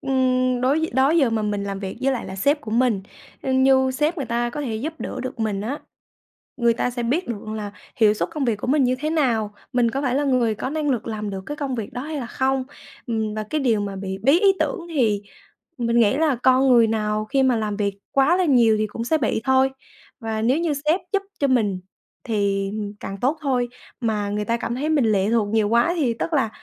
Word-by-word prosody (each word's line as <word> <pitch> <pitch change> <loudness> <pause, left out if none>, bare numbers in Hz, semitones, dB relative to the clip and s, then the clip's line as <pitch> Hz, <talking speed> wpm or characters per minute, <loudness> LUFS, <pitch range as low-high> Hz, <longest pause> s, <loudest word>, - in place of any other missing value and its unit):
ưm, 255 -2 +1
đối 295 +5 +1
đó 265 +3 +3
giờ 300 -7 +3
mà 225 -1 0
mình 205 -1 -1
làm 200 -1 -4
việc 195 -1 -5
với 270 +1 +2
lại 245 - -3
là 190 - -7
sếp 285 +9 +2
của 215 - -8
mình, 230 -3 +2 0.4
như 265 0 +3
sếp 300 +6 0
người 280 -6 -3
ta 240 +1 -1
có 295 - -5
thể 235 -6 -3
giúp 290 +9 -3
đỡ 255 - -4
được 255 -1 -6
mình 210 -3 -1
á, 255 +8 -3 0.8
người 235 -2 +3
ta 245 - -1
sẽ 240 0 -4
biết 300 +10 0
được 215 -2 -5
là 205 -1 -5 0.2
hiệu 215 -2 +4
suất 215 - -2
công 300 -4 -2
việc 230 -4 +1
của 210 - -6
mình 275 +1 +3
như 255 +1 +1
thế 305 +2 -1
nào, 230 -9 0 0.2
mình 245 -2 +2
có 275 +4 -2
phải 255 -3 0
là 285 +2 +1
người 250 -5 +2
có 235 +5 -4
năng 300 -1 -1
lực 240 -4 -1
làm 215 -2 -4
được 190 -1 -5
cái 295 - -5
công 280 -4 -3
việc 220 -4 -5
đó 245 - -4
hay 310 +2 -5
là 250 - -4
không. 265 +2 0 0.4
Ừm, 220 -3 -2
và 215 - -2
cái 305 - 0
điều 230 -6 +2
mà 200 -1 -4
bị 190 0 -5
bí 280 +9 +4
ý 400 -1 +6
tưởng - - 0
thì 215 -7 +2 0.6
mình 235 -1 +1
nghĩ 225 +3 +3
là 305 -4 +2
con 260 +1 +5
người 235 -3 +6
nào 215 -1 -1
khi 270 +5 +1
mà 260 -2 +3
làm 210 -2 -2
việc 200 -1 -2
quá 275 +6 +3
là 370 - +2
nhiều 235 -7 +4
thì 215 0 0
cũng 230 +3 -5
sẽ 315 +7 +1
bị 225 -5 0
thôi. 265 0 +3 0.5
Và 220 -2 -3
nếu 250 +6 +2
như 335 -3 0
sếp 300 +6 +1
giúp 400 - +2 0.2
cho 280 - +2
mình 215 -8 +1 0.4
thì 200 -4 0 0.3
càng 195 - -6
tốt 280 +6 +1
thôi, 255 -4 0 0.3
mà 210 -3 -1
người 210 +1 -2
ta 235 +1 0
cảm 235 0 -3
thấy 290 +5 -2
mình 295 -6 +3
lệ 205 -2 +2
thuộc 225 -3 +2
nhiều 220 -1 +1
quá 235 +9 +3
thì 260 -7 +1
tức 335 - -2
là 265 -7 +2
245 Hz, 245 wpm, -22 LUFS, 215-270 Hz, 0.8 s, ý